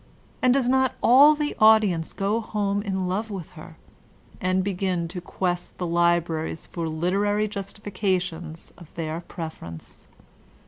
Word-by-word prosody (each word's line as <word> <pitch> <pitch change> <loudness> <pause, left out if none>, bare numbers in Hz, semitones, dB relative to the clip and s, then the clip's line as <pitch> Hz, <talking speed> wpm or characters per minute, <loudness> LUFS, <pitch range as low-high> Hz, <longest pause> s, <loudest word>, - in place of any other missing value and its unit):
And 255 - +4
does 260 -1 +2
not 260 0 +2
all 285 +5 +7
the 295 0 -2
audience 215 -7 +4
go 200 +3 0
home 205 -2 -1
in 190 -3 -2
love 205 +5 -2
with 190 -6 -7
her? 160 0 -12 0.6
And 185 0 0
b^in 185 -3 -1
to 180 +1 -6
quest 180 0 -3
the 180 - -3
libraries 170 -2 0
for 165 -2 -4
literary 200 +6 0
justifications 185 -5 -4
of 170 -3 -14
their 160 -1 -3
preference? 160 - -9
185 Hz, 135 wpm, -25 LUFS, 170-210 Hz, 0.6 s, all